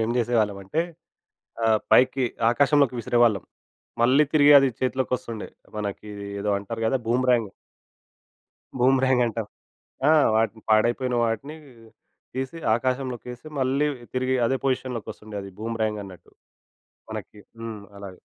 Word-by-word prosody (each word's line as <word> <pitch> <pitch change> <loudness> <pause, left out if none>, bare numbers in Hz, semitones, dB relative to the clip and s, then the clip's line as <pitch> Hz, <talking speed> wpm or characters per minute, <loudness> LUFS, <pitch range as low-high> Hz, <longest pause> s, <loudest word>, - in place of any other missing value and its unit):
ఏం 115 - -2
జేసేవాళ్ళమంటే 110 0 0 0.8
ఆహ్, 110 -1 +4
పైకి 130 +1 +5 0.3
ఆకాశంలోకి 140 +1 +3
విసిరేవాళ్ళం. 115 -3 +2 0.6
మళ్ళీ 130 +5 +5
తిరిగి 145 -1 +6
అది 135 -1 +3
చేతిలోకొస్తుండే. 125 -3 -2 0.3
మనకి 105 0 -5 0.3
ఏదో 105 0 0
అంటారు 115 +3 -6
గదా! 135 +4 +2
బూమ్‌రాంగ్... 120 -3 +2 1.3
బూమ్‌రాంగంటాం. 125 -3 +2 0.6
ఆ! - - +7 0.2
వాటిని 110 0 0
పాడైపోయిన 120 +3 +2
వాటిని 115 +7 -3 0.8
తీసి, 130 +4 -4 0.2
ఆకాశంలోకేసి, 125 0 -3
మళ్ళీ 135 +3 +1 0.3
తిరిగి 130 0 0
అదే 135 +3 +1
పొజిషన్‌లోకొస్తుండే. 120 -5 -3
అది 100 0 -9
బూమ్‌రాంగన్నట్టు 105 -4 -4 0.8
మనకి. 105 - -7 0.2
హ్మ్. 115 -2 -6 0.2
అలాగ. 100 -2 -9
120 Hz, 100 wpm, -25 LUFS, 110-130 Hz, 1.3 s, ఆ